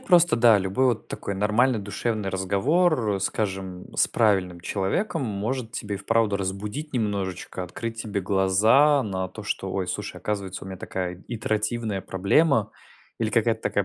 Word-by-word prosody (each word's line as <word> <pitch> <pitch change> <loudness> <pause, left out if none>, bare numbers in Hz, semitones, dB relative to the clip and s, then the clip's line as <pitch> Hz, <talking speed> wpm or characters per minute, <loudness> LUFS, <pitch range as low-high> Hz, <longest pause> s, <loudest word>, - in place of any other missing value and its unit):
просто 175 -9 +5
да. 115 -3 +6
Любой 95 +8 +1
вот 115 -3 0
такой 100 - -5
нормальный 110 +4 +2
душевный 105 0 -2
разговор, 105 - +1
скажем, 95 -3 -3
с - - +3
правильным 95 -6 +1
человеком 120 - -1
может 110 +2 -3
тебе 105 -3 -4
и 100 - -4
вправду 110 0 +1
разбудить 105 +10 -4
немножечко, 100 -5 -2
открыть 115 +5 -5
тебе 100 -2 -2
глаза 110 +10 +4
на 95 -2 -3
то, 110 - -10
что 95 -2 -3
"Ой, 95 -2 -1
слушай, - - -4
оказывается, 100 -3 -4
у - - -9
меня 95 - -6
такая 90 0 -5
итеративная 110 -2 -1
проблема 110 - +2 0.5
или - - +1
какая-то - - +2
такая - - 0
105 Hz, 150 wpm, -25 LUFS, 95-115 Hz, 0.5 s, да